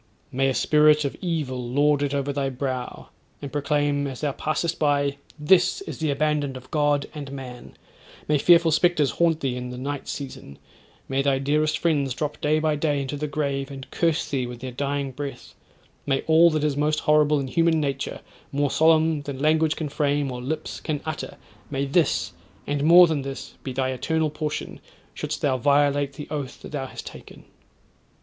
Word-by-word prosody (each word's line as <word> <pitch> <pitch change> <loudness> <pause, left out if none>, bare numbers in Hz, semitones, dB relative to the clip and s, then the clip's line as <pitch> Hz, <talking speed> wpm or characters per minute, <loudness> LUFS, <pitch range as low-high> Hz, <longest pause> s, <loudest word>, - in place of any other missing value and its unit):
May 135 +1 +1
a 130 - -1
spirit 150 0 +4
of 140 - -2
evil 150 -8 -2
lord 145 +4 +2
it 145 -1 0
over 140 0 -1
thy 140 -1 -1
brow, 130 -1 -4 0.3
and 140 -2 -7
proclaim, 145 -1 0
as 130 -2 -7
thou 145 -2 0
passest 155 +4 -2
by, 145 -2 +1 0.2
"THIS 180 - +3
IS 390 - -7
THE 160 -1 0
ABANDONED 145 -1 0
OF 130 +1 -14
GOD 145 -2 +1
AND 145 -3 -7
MAN;" 130 -3 -9 0.5
may 150 -1 +2
fearful 170 +1 +5
spectres 155 -4 +3
haunt 165 +1 +1
thee 130 -2 -1
in 125 0 -5
the 125 - -7
night 140 +2 -4
season; 130 - -7 0.5
may 135 0 0
thy 135 -1 +2
dearest 150 +3 +1
friends 140 -6 0
drop 150 -1 -4
day 150 +1 +2
by 155 -1 +1
day 145 -1 0
into 140 +1 -3
the 150 +1 -3
grave, 140 -2 -2
and 135 -1 -9
curse 165 -2 +1
thee 130 -3 -2
with 120 -1 -8
their 130 0 -5
dying 140 +1 -2
breath: 135 -1 -7 0.5
may 135 -1 +1
all 165 +2 +5
that 155 -2 -1
is 150 -2 +1
most 150 +1 +1
horrible 150 -1 +3
in 135 - -2
human 165 +4 +2
nature, 140 -2 -3 0.3
more 140 0 0
solemn 160 -1 +3
than 140 -2 -6
language 155 +2 +2
can 160 - -3
frame, 145 -1 0
or 125 0 -5
lips 155 +5 -4
can 150 -2 -3
utter, 155 -1 -5 0.3
may 140 -1 -1
this, 155 +4 +1 0.3
and 145 0 -1
more 175 +3 +9
than 160 -4 -1
this, 135 0 -7
be 130 - -5
thy 130 +1 -1
eternal 160 +4 -1
portion, 150 0 -4 0.3
shouldst 150 0 -4
thou 135 -3 +2
violate 145 +1 +2
the 145 +1 -8
oath 145 -3 -4
that - - -9
thou 135 -3 -3
has - - -8
taken.' - - -12
145 Hz, 190 wpm, -24 LUFS, 135-155 Hz, 0.5 s, more